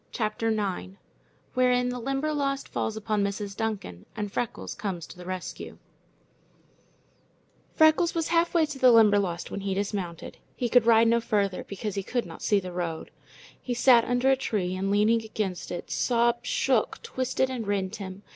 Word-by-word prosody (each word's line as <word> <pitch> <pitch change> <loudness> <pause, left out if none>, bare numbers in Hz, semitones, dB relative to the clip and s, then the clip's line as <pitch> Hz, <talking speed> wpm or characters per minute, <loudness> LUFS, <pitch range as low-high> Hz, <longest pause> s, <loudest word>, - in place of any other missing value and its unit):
CHAPTER 220 -1 -2
IX 200 -3 -2 0.6
Wherein 250 -1 +2
the 250 0 -4
Limberlost 275 +2 -1
Falls 220 - -3
upon 215 -1 0
Mrs. 200 0 -3
Duncan 200 - -4
and 210 -2 -4
Freckles 240 - -3
Comes 190 -5 -4
to - - -12
the 180 0 -11
Rescue 185 -1 -6 2.0
Freckles 315 +2 +4
was 330 -1 -1
halfway 335 -1 +3
to 295 -3 -7
the 255 -1 +7
Limberlost 205 -6 +3
when - - -4
he 195 -1 -2
dismounted. 195 -4 -4 0.2
He 245 - -2
could 240 -1 +4
ride 230 0 +6
no 235 +1 +3
farther, 200 -4 -1
because 200 +1 -5
he 195 - -2
could 240 +5 -2
not - - -10
see 205 - +2
the 180 -2 -7
road. 170 -2 -4 0.5
He 245 - -3
sat 240 -1 +6
under 245 +3 +2
a - - +5
tree, 195 -8 -2
and, 195 +1 -2
leaning 210 +3 +3
against 215 -4 -4
it, 175 - -6
sobs 235 0 +1
shook, - - +1
twisted, 260 - -1
and 235 -5 -4
rent 200 0 -1
him. 195 0 -8
220 Hz, 165 wpm, -27 LUFS, 195-250 Hz, 2.0 s, the